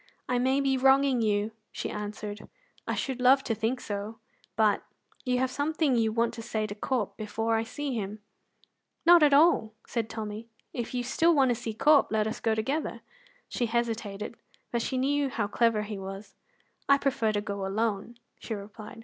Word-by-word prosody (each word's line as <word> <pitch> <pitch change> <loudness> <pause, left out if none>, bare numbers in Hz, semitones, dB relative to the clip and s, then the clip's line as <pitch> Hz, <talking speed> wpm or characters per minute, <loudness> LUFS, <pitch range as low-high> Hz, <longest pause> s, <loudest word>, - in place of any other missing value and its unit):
"I 250 -1 +1
may 260 +2 +2
be 270 -1 +2
wronging 265 -1 +4
you," 210 0 +1 0.2
she - - -4
answered; 210 0 -6 0.4
"I - - 0
should 260 -2 -3
love 265 +2 +6
to 230 - -1
think 225 +3 -1
so; 205 +1 -5 0.4
but 215 -2 +3 0.4
you 250 -1 +1
have 260 0 0
something 295 -1 +1
you 225 -2 +2
want 230 +1 +1
to 230 - -7
say 220 -1 -2
to 210 - -5
Corp 215 0 -2
before 225 +1 -1
I 225 - +2
see 265 +4 -4
him." 210 -2 -3 0.9
"Not 345 0 +8
at 295 -1 +6
all," 280 -7 +4 0.3
Tommy 215 -1 -5
said; 230 - -22 0.2
"if 240 0 -4
you 245 - 0
still 325 +7 +3
want 270 -3 +4
to - - +3
see 225 -2 -5
Corp, 295 +5 +5
let 215 -1 +2
us 220 - -3
go 225 -1 +1
together." 270 +9 -2 0.5
She 240 - -1
hesitated, 225 -2 -2 0.3
but 235 - 0
she 260 - -2
knew 280 +2 +1
how 225 -4 -1
clever 225 0 +2
he 210 -1 -6
was. 195 +2 -8 0.6
"I 280 - +7
prefer 265 -6 +1
to 205 - +1
go 200 -2 -4
alone," 215 +3 -2 0.2
she 225 - -4
replied. 210 +3 -10
230 Hz, 185 wpm, -28 LUFS, 215-260 Hz, 0.9 s, Not